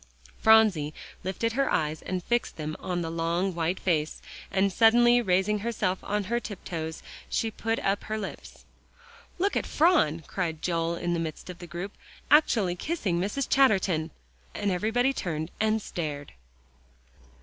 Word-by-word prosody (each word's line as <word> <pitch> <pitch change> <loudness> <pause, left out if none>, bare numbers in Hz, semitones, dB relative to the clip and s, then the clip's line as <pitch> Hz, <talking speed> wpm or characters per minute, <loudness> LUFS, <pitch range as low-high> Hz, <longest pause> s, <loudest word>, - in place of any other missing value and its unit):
Phronsie 210 -10 +5 0.3
lifted 205 +5 -1
her 275 +2 +1
eyes 155 0 0
and 185 -1 -3
fixed 240 +3 -1
them 155 0 -4
on 175 -1 -2
the 165 - -4
long, 170 +3 0
white 170 +2 -1
face, 155 -4 0 0.3
and 195 0 +1
suddenly 240 +3 +5
raising 190 +1 +2
herself 200 -4 -1
on 210 0 -1
her 235 +5 -1
tiptoes, 170 -7 -6 0.3
she 225 - 0
put 225 +1 -2
up 195 +1 -1
her 215 0 -2
lips. 205 -3 -8 0.7
"Look 395 +3 0
at - - 0
Phron," 295 - +3
cried 165 -4 -3
Joel 170 -1 0
in 175 0 -2
the 170 - 0
midst 165 +2 -5
of 175 - -13
the 175 - -9
group, 175 +5 -5 0.4
"actually 220 - +4
kissing 195 - -1
Mrs. 225 +8 -1
Chatterton!" 190 -11 +3 0.5
and 205 -1 0
everybody 225 +8 +1
turned 160 - -3
and 220 0 +2
stared. 145 -4 -5
190 Hz, 150 wpm, -27 LUFS, 165-220 Hz, 0.7 s, Phronsie